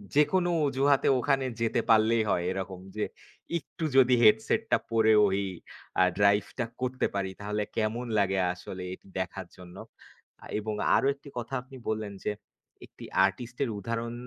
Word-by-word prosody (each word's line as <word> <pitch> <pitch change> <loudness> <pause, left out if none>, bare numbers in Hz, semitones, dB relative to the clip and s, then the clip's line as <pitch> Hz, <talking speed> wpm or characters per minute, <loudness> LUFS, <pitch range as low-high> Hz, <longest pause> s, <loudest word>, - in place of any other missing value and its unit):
যেকোনো 175 +5 +3 0.2
অজুহাতে 140 0 +2
ওখানে 135 0 +1 0.2
যেতে 115 +1 +1
পারলেই 110 0 +5
হয়। 85 - +1
এরকম 95 -1 -5 0.2
যে, 105 - -1 0.6
একটু 160 - -10
যদি 130 -1 +6
হেডসেট 110 0 +4
টা - - +6
পরে 110 -1 +4
ওই 100 +1 0 0.6
আ - - +7 0.2
ড্রাইভ 100 0 +4
টা 120 - +1 0.2
করতে 130 0 0
পারি 95 -1 -1
তাহলে 105 +1 -2
কেমন 115 +2 -1
লাগে 95 -1 +1
আসলে 90 +1 -8
এটি 95 - -13
দেখার 95 0 -4
জন্য। 90 -1 -12 0.8
এবং 110 0 -3 0.2
আরো 135 - +3
একটি 140 +1 -14
কথা 120 +2 -5
আপনি 130 +1 -13
বললেন 110 -2 -2
যে, - - 0 0.5
একটি - - -12 0.2
আর্টিস্ট 120 +5 -4
এর 130 - -1
উদাহরণ 115 +3 -3
110 Hz, 155 wpm, -28 LUFS, 100-125 Hz, 0.8 s, আ